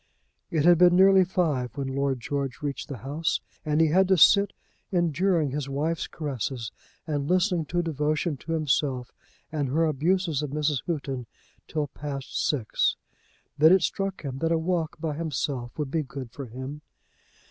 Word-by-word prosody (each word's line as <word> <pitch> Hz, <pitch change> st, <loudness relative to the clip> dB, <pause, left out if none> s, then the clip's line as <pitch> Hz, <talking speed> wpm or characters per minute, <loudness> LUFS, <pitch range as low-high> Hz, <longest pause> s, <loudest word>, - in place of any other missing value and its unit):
It 155 Hz, -2 st, +1 dB
had 175 Hz, -1 st, +6 dB
been 180 Hz, 0 st, +6 dB
nearly 190 Hz, 0 st, +7 dB
five 150 Hz, -, -1 dB
when 135 Hz, -1 st, -2 dB
Lord 140 Hz, -2 st, 0 dB
George 140 Hz, +1 st, -3 dB
reached 140 Hz, -2 st, -3 dB
the 140 Hz, -, -6 dB
house, 155 Hz, +4 st, 0 dB, 0.2 s
and 150 Hz, 0 st, 0 dB
he 160 Hz, -1 st, +5 dB
had 190 Hz, +4 st, +4 dB
to 190 Hz, -1 st, +4 dB
sit 200 Hz, +4 st, +6 dB, 0.4 s
enduring 175 Hz, -3 st, +1 dB
his 140 Hz, 0 st, -3 dB
wife's 155 Hz, +4 st, -1 dB
caresses, 130 Hz, -5 st, -4 dB, 0.3 s
and 145 Hz, -3 st, -2 dB
listening 180 Hz, -2 st, +2 dB
to 175 Hz, +4 st, -1 dB
devotion 155 Hz, 0 st, -1 dB
to 165 Hz, +5 st, -5 dB
himself 135 Hz, -5 st, 0 dB, 0.4 s
and 145 Hz, -4 st, -1 dB
her 160 Hz, +5 st, +2 dB
abuses 160 Hz, +1 st, +1 dB
of 150 Hz, -, -3 dB
Mrs. 150 Hz, -1 st, 0 dB
Houghton 140 Hz, -7 st, -3 dB, 0.4 s
till 155 Hz, -2 st, -1 dB
past 140 Hz, -1 st, -5 dB
six. 125 Hz, -8 st, +1 dB, 0.6 s
Then 160 Hz, +2 st, +7 dB
it 190 Hz, -2 st, +4 dB
struck 195 Hz, -2 st, -2 dB
him 135 Hz, -2 st, -5 dB
that 165 Hz, +2 st, 0 dB
a 165 Hz, -, +3 dB
walk 165 Hz, -1 st, -1 dB
by 160 Hz, -3 st, -2 dB
himself 140 Hz, -5 st, -3 dB
would 150 Hz, -3 st, -3 dB
be 160 Hz, -, +1 dB
good 130 Hz, -3 st, -7 dB
for 135 Hz, +1 st, -7 dB
him. 130 Hz, +5 st, -7 dB
150 Hz, 170 wpm, -26 LUFS, 140-170 Hz, 0.6 s, nearly